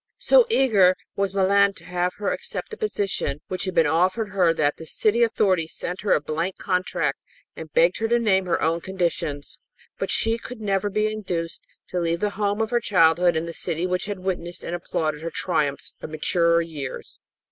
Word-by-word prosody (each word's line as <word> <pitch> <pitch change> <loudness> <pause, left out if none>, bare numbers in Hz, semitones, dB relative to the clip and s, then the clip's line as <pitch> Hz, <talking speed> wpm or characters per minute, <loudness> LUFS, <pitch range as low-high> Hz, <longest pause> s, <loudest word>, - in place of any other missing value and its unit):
So - - +5
eager 210 - +4 0.2
was 200 -1 -1
Milan 200 +1 +3
to - - -13
have 180 0 -1
her 205 -1 -2
accept - - -3
a - - -6
position 200 - -1
which 185 +1 0
had 185 -1 -4
been 165 - +4
offered 185 +8 +1
her 185 -4 +2
that 150 -3 0
the 160 - -9
city 220 +8 +2
authorities 190 -8 +1
sent 180 +2 -4
her 210 - +2
a - - +3
blank 165 +5 -3
contract 185 -1 -1 0.4
and - - -9
begged - - +3
her 225 - 0
to 235 +1 +3
name 190 -5 +1
her 170 - +1
own 165 +1 +1
conditions. 170 -6 -3 0.4
But - - -2
she 225 +1 +3
could 245 0 -9
never 200 -1 -1
be 215 +1 0
induced 180 -6 -4 0.2
to 180 - -2
leave 170 0 -1
the 210 -1 0
home 205 +1 -1
of 220 - -5
her 240 - +2
childhood 175 -4 +3
and 160 +1 -2
the 170 - -6
city 165 +2 +1
which 180 0 -1
had 205 -1 -4
witnessed 175 -2 -3
and 170 - -5
applauded 155 -3 -3
her 165 - -4
triumphs 150 -6 -1
of - - -7
maturer 170 +2 +2
years. 150 -5 -7
185 Hz, 200 wpm, -23 LUFS, 165-205 Hz, 0.4 s, So